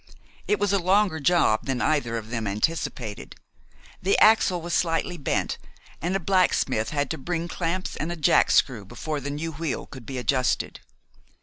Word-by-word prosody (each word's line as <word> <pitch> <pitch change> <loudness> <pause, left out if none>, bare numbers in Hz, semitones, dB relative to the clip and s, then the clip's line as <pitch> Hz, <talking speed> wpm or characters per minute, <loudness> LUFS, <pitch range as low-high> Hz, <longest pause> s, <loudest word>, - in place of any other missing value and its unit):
It 210 - +2
was 205 -1 +1
a 200 - +3
longer 185 -1 +2
job 145 -8 +2
than 135 -2 -1
either 120 -7 0
of 110 0 -7
them 115 -3 -2
anticipated. 110 -1 -3 0.7
The 195 +2 +2
axle 215 -4 +5
was 170 +1 -5
slightly 170 +1 0
bent, 145 - -1 0.4
and 175 +4 -1
a - - +1
blacksmith 175 - +1
had 145 -2 -1
to - - -4
bring 170 +3 -3
clamps 175 +2 -3
and 160 +3 -3
a - - -3
jackscrew 130 -6 +3
before 155 +8 -4
the 140 +1 -5
new 150 +3 -3
wheel 160 -2 -3
could 130 -5 -12
be 135 - -5
adjusted. 125 +1 0
160 Hz, 170 wpm, -25 LUFS, 130-175 Hz, 0.7 s, axle